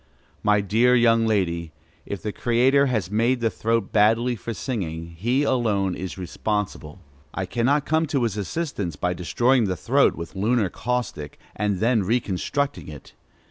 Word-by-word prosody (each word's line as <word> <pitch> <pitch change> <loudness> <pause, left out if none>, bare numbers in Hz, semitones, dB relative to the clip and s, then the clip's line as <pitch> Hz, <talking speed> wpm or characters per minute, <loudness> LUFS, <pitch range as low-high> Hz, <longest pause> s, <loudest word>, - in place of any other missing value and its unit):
My 105 0 +3
dear 115 +6 +3
young 115 -1 +4
lady, 85 -6 -1 0.3
if 100 - -5
the 105 - -2
Creator 130 +6 +3
has 110 -8 -1
made 120 +4 +2
the 115 -2 0
throat 115 -2 -1
badly 115 +3 +3
for 115 +2 -6
singing, 85 - -4
he 120 - 0
alone 105 -8 +1
is 95 +1 -6
responsible. 95 -3 -4 0.3
I 95 - -2
cannot 125 +9 +1
come 160 +1 +1
to 140 -4 0
his 115 -4 -1
assistance 105 - -3
by 90 +4 -1
destroying 120 +8 +2
the 95 -2 -2
throat - - +2
with 85 +3 -8
lunar 105 +1 +1
caustic, 120 -12 -3 0.2
and 105 -1 0
then 115 +2 +2
reconstructing 120 +6 -1
it. 75 -2 -11
110 Hz, 155 wpm, -24 LUFS, 95-125 Hz, 0.3 s, young